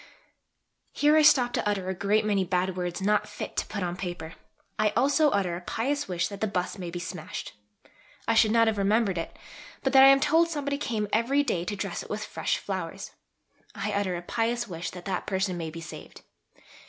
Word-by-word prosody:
(Here 295 +1 +4
I 315 - +6
stop 265 -5 +5
to - - 0
utter 195 -3 -2
a 190 - -1
great 205 +3 +1
many 200 -2 +2
bad 180 0 0
words, 180 0 -3
not 210 +1 +2
fit - - -7
to - - 0
put 200 -3 -4
on 175 0 -2
paper. 175 -3 -6 0.5
I 215 0 +4
also 290 +3 +4
utter 190 -7 0
a 175 - -6
pious 280 +10 -2
wish 175 -2 -1
that 200 -1 -9
the 220 - +2
bust 185 -1 -3
may 175 -2 -5
be 175 - -5
smashed.) 175 -2 -6 0.7
I 230 - +3
should 220 -1 +5
not 230 +1 +4
have 220 -2 0
remembered 200 -2 +2
it, 165 - -6 0.5
but 265 - 0
that 265 0 +9
I - - +10
am 275 0 +7
told 325 +4 +3
somebody 285 -3 -2
came 220 -7 -2
every 265 +6 +3
day 180 -10 -1
to 205 - -3
dress 195 - -4
it - - -11
with - - -3
fresh - - -1
flowers. - - -5 0.6
I 210 - -2
utter 200 -3 0
a 175 - -5
pious 235 +4 -1
wish 175 -2 -5
that 180 -1 -10
that 190 -2 -3
person 190 -1 0
may 165 -2 -4
be 165 +1 -8
saved. 160 - -10
205 Hz, 215 wpm, -27 LUFS, 180-240 Hz, 0.7 s, I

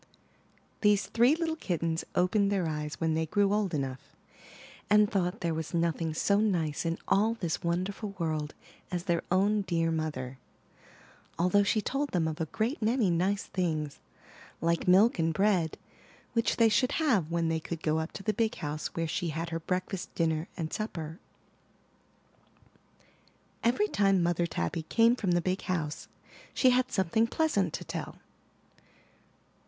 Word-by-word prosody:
These 210 -2 +4
three 240 +6 +4
little 325 -1 -1
kittens 165 - -1
opened 200 +3 +2
their 190 -4 +1
eyes 150 -1 -3
when 160 -1 +1
they 160 0 0
grew 205 +3 +2
old 205 -3 +1
enough, 135 -3 -5 0.7
and 210 0 +6
thought 195 0 -1
there 170 -2 0
was 160 +2 -4
nothing 165 -1 0
so 200 +4 +2
nice 170 -7 0
in 165 +1 -1
all 220 +3 +3
this 170 -8 -3
wonderful 190 +4 -2
world 155 -3 -2 0.3
as 175 -2 -3
their 170 -3 0
own 205 +3 +3
dear 165 -3 0
mother, 135 -5 -3 1.0
although 180 +4 +3
she 210 +2 +1
told 280 +2 -1
them 170 -3 +1
of 160 +1 -4
a 160 - -1
great 230 - -2
many 220 -3 +2
nice 190 +4 +1
things, 155 -5 -2 0.6
like 170 +2 0
milk 190 +4 +5
and 165 -1 +1
bread, 190 -5 +2 0.6
which 230 -1 +1
they 230 - +5
should 250 +3 +2
have 225 - +2
when 170 -1 0
they 160 0 0
could 165 0 -6
go 155 0 +1
up 160 +1 -4
to 195 - -7
the 215 - 0
big 220 +1 0
house 150 -1 -4
where 165 - 0
she 180 +1 -2
had 165 +2 -4
her 165 - -2
breakfast, 185 +2 -3
dinner, 160 0 0
and 160 -3 -4
supper. 165 -7 -4 2.4
Every 245 - +2
time 195 - +2
Mother 175 0 +1
Tabby 85 - -2
came 230 +8 +3
from 195 -7 0
the 175 - +2
big 185 +2 -1
house 160 -5 -3 0.5
she 255 - +5
had 255 +1 +2
something 215 +3 +2
pleasant 230 - +1
to - - -4
tell. - - -6
180 Hz, 160 wpm, -29 LUFS, 160-210 Hz, 2.4 s, and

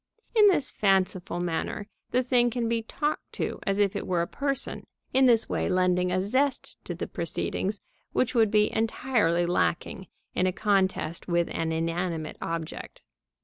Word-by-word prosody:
In 425 -2 +7
this 320 -9 +2
fanciful 190 -3 +1
manner 175 +4 -2 0.2
the 255 +1 +2
thing 245 -1 +3
can 235 0 -1
be 230 0 0
talked 295 +7 -3
to - - -3
as 195 0 +1
if 205 0 +2
it - - -3
were 175 -2 +1
a - - -4
person, 275 -1 -2 0.3
in 265 +1 +5
this 230 -2 +4
way - - -1
lending 180 0 +2
a 185 - +1
zest 260 +9 0
to - - -4
the - - -3
proceedings 200 +1 -2 0.3
which 255 - +1
would 225 -3 +4
be 210 0 +3
entirely 220 -6 +1
lacking 175 +2 -1 0.3
in 185 - +2
a - - +2
contest 190 -5 0
with 170 -1 +1
an 165 0 -1
inanimate 165 -1 -2
object. 165 -1 -5
195 Hz, 165 wpm, -27 LUFS, 175-235 Hz, 0.3 s, In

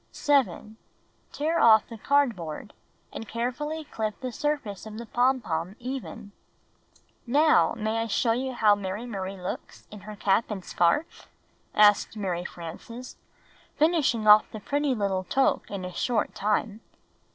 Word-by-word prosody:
7. 220 - 0 0.5
Tear 320 +3 -1
off 220 -1 +6
the 230 - -9
cardboard, 220 - 0 0.4
and 225 - -7
carefully 275 +8 -3
clip 220 -7 -4
the 255 -1 -4
surface 245 -8 -3
of 215 0 -8
the 235 - -6
pompon 220 -8 0
even. 240 -4 -7 1.0
''Now, 295 +3 +4
may 220 0 -1
I 230 - -2
show 230 +2 +1
you 255 +2 -2
now 210 -2 +6
Mary 205 +3 -4
Marie 195 -4 -5
looks 180 - -7
in 210 - -9
her 210 +2 -9
cap 205 +2 +1
and 195 -4 -5
scarf?" 175 - 0 0.5
asked 210 +1 +4
]\Iary 180 -4 -2
Frances, 205 +9 -9 0.6
finishing 300 -8 +2
off 210 0 +7
the 215 - -8
pretty 285 +3 0
little 195 -3 -1
toque 270 +7 +1
in 195 -2 -5
a 180 - -7
short 230 0 -1
time. 210 +1 -1
220 Hz, 140 wpm, -26 LUFS, 200-255 Hz, 1.0 s, off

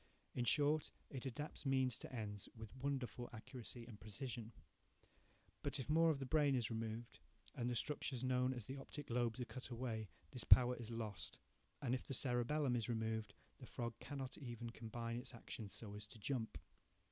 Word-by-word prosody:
1 - - -3
In 120 - +3
short, 150 +4 +5 0.2
it 135 -1 -2
adapts 145 +5 -4
means 130 -3 +3
to - - -7
ends 105 -5 -3
with 110 +1 -7
wonderful 130 -3 -1
accuracy 120 +1 -6
and 115 -3 -9
precision. 115 +1 -4 1.1
But 140 0 -1
if 135 +3 -1
more 165 +1 +7
of 155 - +4
the 135 - -2
brain 145 0 +5
is 120 -3 +1
removed, 115 +1 -3 0.3
and 120 0 0
the 120 - +1
structures 130 0 0
known 130 0 +4
as 120 -5 -3
the 135 +4 -4
optic 140 0 -6
lobes 120 0 +2
are 125 - 0
cut 130 0 -6
away, 115 -4 -2 0.2
this 125 -5 -2
power 125 0 +9
is 120 -2 -6
lost; 110 -4 -3 0.5
and 125 -2 +2
if 130 - -1
the 135 - 0
cerebellum 125 +2 +3
is 115 -2 0
removed, 110 -3 0 0.2
the - - -8
frog 120 -1 -2
cannot 135 -3 -4
even 120 -3 -4
combine 115 +1 -3
its 125 0 -6
actions 110 -3 -5
so 105 -3 -5
as 105 0 -5
to 110 - -9
jump. 115 +1 0
120 Hz, 185 wpm, -42 LUFS, 115-135 Hz, 1.1 s, power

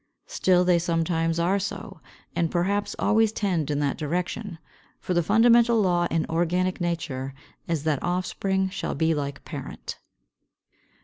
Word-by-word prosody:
Still 185 - +2
they 180 -1 +4
sometimes 165 -1 0
are 180 +4 +2
so, 200 +1 -6 0.3
and 170 -1 +1
perhaps 200 +4 0
always 220 0 +3
tend 180 -9 -1
in 145 - 0
that 140 0 -1
direction. 175 +5 -3 0.4
For 180 - -2
the 175 - +3
fundamental 230 +4 +5
law 175 -3 +2
in 160 -1 0
organic 175 +3 0
nature 135 -6 -3 0.3
is 165 -4 -1
that 155 -3 0
offspring 190 +1 -1
shall 190 - -4
be 160 0 +2
like 140 -2 -4
parent. - - -7
175 Hz, 140 wpm, -25 LUFS, 165-195 Hz, 0.4 s, fundamental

